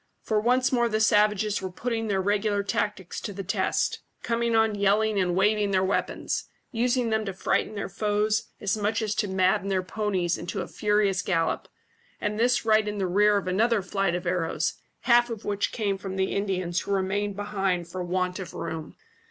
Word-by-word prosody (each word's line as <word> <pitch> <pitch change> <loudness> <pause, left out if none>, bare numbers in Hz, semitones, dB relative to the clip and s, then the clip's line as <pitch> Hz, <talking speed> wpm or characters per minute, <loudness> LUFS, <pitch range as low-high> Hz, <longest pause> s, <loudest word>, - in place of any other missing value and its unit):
For 215 -1 +1
once 250 +3 +2
more 240 -2 +2
the 215 -1 0
savages 210 -1 +3
were 190 - -3
putting 225 +4 -3
their 195 -2 0
regular 205 0 +1
tactics 200 -2 -2
to 205 - -5
the 195 +1 -5
test, 190 - 0 0.2
coming 235 -1 0
on 220 -1 +3
yelling 205 +1 +2
and 180 -2 +1
waving 205 +2 +2
their 190 -1 +2
weapons, 190 +1 -1 0.3
using 240 -1 +1
them 220 0 +1
to 195 - -3
frighten 205 +3 0
their 200 - -3
foes 210 +2 0
as 200 0 0
much 215 +2 0
as 215 -1 -1
to 210 0 0
madden 190 +1 +1
their 190 -1 +1
ponies 185 -3 -1
into 175 - -4
a - - -5
furious 210 -2 +1
gallop, 165 -3 0 0.5
and 210 +1 -2
this 245 0 +2
right 215 -1 +4
in 210 0 -3
the 195 - 0
rear 205 +3 +4
of 195 - -3
another 215 +3 +2
flight 195 -1 0
of 175 +1 -4
arrows, 165 -3 0 0.3
half 240 0 +4
of 225 -3 -6
which 205 -1 -1
came 200 -4 -1
from 190 -1 -5
the 190 0 0
Indians 185 -3 -1
who - - -6
remained 200 +1 0
behind 195 -4 -1
for 180 +2 -5
want 180 +1 -1
of 185 - -7
room. 160 -2 -5
205 Hz, 195 wpm, -26 LUFS, 190-215 Hz, 0.5 s, right